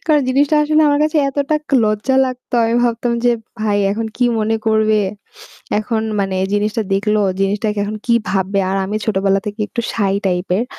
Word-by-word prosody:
কারণ 300 -2 +4
জিনিসটা 280 +3 +2
আসলে 305 +1 +3
আমার 290 0 +2
কাছে 310 +1 -1
এতটা 295 +2 -1 0.2
লজ্জা 215 +5 0
লাগতো। 250 -1 -7
আমি 230 +1 0
ভাবতাম 235 0 0
যে 245 - +5 0.3
"ভাই 205 -1 +1
এখন 225 +2 -2
কি 250 - +1
মনে 220 +1 0
করবে?" 220 -1 +3 0.8
এখন 220 +1 -2 0.2
মানে 195 -1 -1
এ - - +1
জিনিসটা 210 +2 0
দেখল 210 +2 +1 0.2
জিনিসটা 200 +3 0 0.2
এখন 210 +1 -4
কি 235 - +3 0.2
ভাববে? 195 +1 0
আর 195 - 0
আমি 205 +3 -3
ছোটবেলা 195 -2 +1
থেকে 210 +1 -5
একটু 240 - -3
shy 200 -3 0
টাইপ 180 0 -1
এর। 230 - 0
220 Hz, 185 wpm, -17 LUFS, 205-250 Hz, 0.8 s, যে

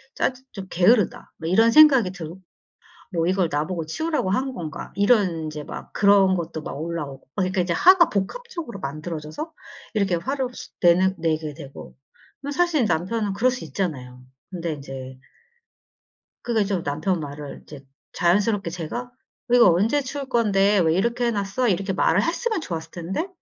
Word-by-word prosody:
짜증 260 0 -1
좀 195 -3 -8
게으르다.' 205 +4 +2
뭐 160 +1 -3
이런 225 +5 +5
생각이 270 -10 +7
들고 175 0 -9 0.7
뭐 165 -1 0
'이걸 185 -1 +2
나보고 155 +3 -2
치우라고 305 - -1
한 260 +6 0
건가?' 170 -3 -7
이런 200 -6 +2
인제 155 -1 -6
막 - - -9
그런 200 -2 +5
것도 160 -3 -4
막 145 - -6
올라오고. 150 -6 -5
막 190 - +1
그러니까 185 +1 0
이제 175 - -1
화가 350 - +6
복합적으로 310 - -4
만들어져서 155 - -6 0.4
이렇게 200 -4 +1
화를 260 +8 -2 0.3
내는 185 +2 +4
내게 155 -2 -1
되고. 140 -3 -11 0.5
근데 285 0 -5
사실 340 -8 +2
남편은 200 +4 -1
그럴 250 +5 +3
수 250 -8 -5
있잖아요. 130 -6 -4 0.3
근데 170 -3 -3
인제 135 -2 -8 1.3
그러니까 225 -3 +1
이제 175 - -3
남편 160 +5 -1
말은 145 -1 -7
이제 140 -3 -12 0.3
자연스럽게 200 +1 +1
제가 175 +7 -4
"어 245 - -19 0.4
이거 240 -6 +7
언제 225 +12 +2
치울 275 +1 -5
건데? 205 -4 +3
왜 160 -2 +3
이렇게 235 +5 0
해 - - +1
놨어?" 200 +4 -1
이렇게 195 +1 0
말을 185 +1 +2
했으면 390 - -1
좋았을 165 - -5
텐데 185 - -3
190 Hz, 355 characters per minute, -23 LUFS, 160-235 Hz, 1.3 s, 생각이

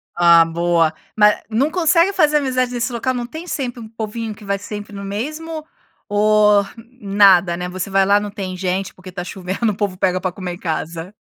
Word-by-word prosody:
Ah, 170 -1 +6
boa. 165 -1 +1 0.2
Ma 210 0 +6
não 265 +8 +1
consegue 335 +2 +3
fazer 300 -5 +3
amizades 255 -3 0
nesse 240 +1 -2
local? 255 +2 -1
Não 245 -1 -3
tem 315 +8 -9
sempre 250 -7 -4
um 220 - -9
povinho 225 0 -5
que 210 - -14
vai 200 0 -1
sempre 205 0 -8
no 200 - -7
mesmo 305 +10 -5 0.4
ou, 210 0 +4 0.4
nada, 195 -4 +4
né, 180 0 -4
você 185 +1 -5
vai 195 0 +3
lá 200 +1 +4
não 205 0 -5
tem 195 -3 -5
gente 185 +1 -2
porque 185 0 -12
está 180 -1 -6
chovendo, 190 +4 -2
o - - -6
povo 200 -2 -2
pega 185 -1 +1
para 185 - -1
comer 180 -2 -5
em - - -8
casa? 165 +2 -4
205 Hz, 200 wpm, -19 LUFS, 185-240 Hz, 0.4 s, Ah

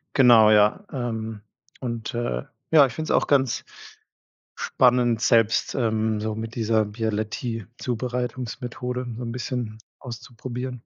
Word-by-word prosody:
Genau, 115 -5 +7
ja, 105 - +4
ähm. 110 -5 -4 0.4
Und, 115 -3 -4
äh 120 - -2 0.3
ja, 150 -3 +8
ich 125 - -4
find 155 +4 -4
's - - -1
auch - - +3
ganz 135 -4 +2 0.9
spannend, 125 -2 +3
selbst, 115 -3 +3
ähm, 110 -3 0
so 110 0 -2
mit 110 +1 -6
dieser 110 -2 +2
Bialetti-Zubereitungsmethode 120 +3 -3
so - - -6
'n 115 - -4
bisschen 120 -3 -4 0.2
auszuprobieren. 125 +1 -6
120 Hz, 120 wpm, -24 LUFS, 110-125 Hz, 0.9 s, ja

